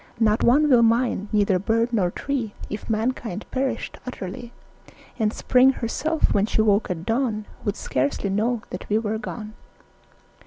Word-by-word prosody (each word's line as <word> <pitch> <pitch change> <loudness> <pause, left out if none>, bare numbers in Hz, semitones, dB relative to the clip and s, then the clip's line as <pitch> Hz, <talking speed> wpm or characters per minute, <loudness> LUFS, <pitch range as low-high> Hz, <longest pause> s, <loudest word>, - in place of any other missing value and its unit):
Not 215 -1 +3
one 285 +6 +5
would 250 -5 +6
mind, 230 -2 +2
neither 205 -3 +2
bird 230 +4 0
nor 190 -6 +2
tree 240 0 -3 0.2
If 210 - -6
mankind 220 -2 -2
perished 265 0 -2
utterly; 235 -1 -7 0.7
And 215 -2 +2
Spring 255 +3 +4
herself, 305 +7 0
when 205 +1 +2
she 220 - +2
woke 210 0 +2
at 170 -2 -4
dawn, 225 -2 0 0.2
Would 205 - 0
scarcely 140 +9 -1
know 225 +3 0
that 180 - -7
we 210 - +3
were 220 0 -1
gone. 215 -2 -7
220 Hz, 155 wpm, -24 LUFS, 205-245 Hz, 0.7 s, would